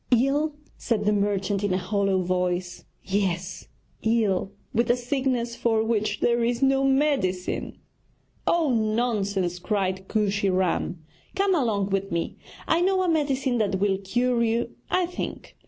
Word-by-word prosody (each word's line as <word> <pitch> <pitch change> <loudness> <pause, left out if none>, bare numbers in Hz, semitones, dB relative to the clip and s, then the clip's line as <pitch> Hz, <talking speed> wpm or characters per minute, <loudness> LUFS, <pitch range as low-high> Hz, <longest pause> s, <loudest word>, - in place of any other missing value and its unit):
'Ill?' 280 +5 +2 0.2
said 215 -3 -1
the 210 - +3
merchant 200 -1 0
in 195 -3 +1
a - - +2
hollow 195 0 0
voice, 180 0 -2 0.2
'yes; 185 -2 -2 0.3
ill 215 -4 +1 0.2
with 235 +1 +1
a 240 - +5
sickness 245 -2 -1
for 225 -2 +1
which 215 -2 -1
there 235 0 +2
is 240 +2 0
no 270 0 +3
medicine.' 265 -10 0 0.7
'Oh, 320 -6 +3
nonsense!' 215 -5 0
cried 190 -1 -1
Kooshy 200 -2 +1
Ram. 185 -2 0 0.3
'Come 390 0 +2
along 215 - +1
with 195 0 -1
me, 170 0 -2 0.3
I 330 - +3
know 375 +1 +2
a - - 0
medicine 275 -6 +1
that 195 -3 0
will 195 -1 +1
cure 240 +5 0
you, 230 +1 0 0.2
I 365 - +2
think.' 355 +1 -6
215 Hz, 145 wpm, -25 LUFS, 190-250 Hz, 0.7 s, a